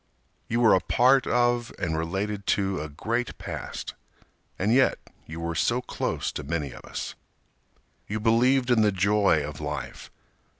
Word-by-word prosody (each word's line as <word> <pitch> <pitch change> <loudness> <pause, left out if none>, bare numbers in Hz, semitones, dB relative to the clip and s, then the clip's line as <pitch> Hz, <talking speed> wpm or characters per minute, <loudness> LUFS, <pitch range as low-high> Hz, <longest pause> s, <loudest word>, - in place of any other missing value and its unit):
You 115 +2 0
were 115 - +6
a 95 - +5
part 130 +6 +3
of 120 -1 +1
and 80 -3 -2
related 95 +5 -3
to 95 -4 -1
a 75 - -5
great 115 +11 -3
past, - - -6 0.6
And 105 +5 +1
yet 130 +1 +4 0.3
you 80 +1 -7
were 85 0 -2
so 120 +9 +1
close 125 - -3
to 75 - -6
many 75 -2 -3
of - - -12
us. - - -5 0.9
You 110 +1 -3
believed 125 +4 +3
in 115 -2 +4
the 105 -1 +4
joy 100 -4 +3
of 75 0 -8
life. 75 0 -5
105 Hz, 160 wpm, -26 LUFS, 85-120 Hz, 0.9 s, were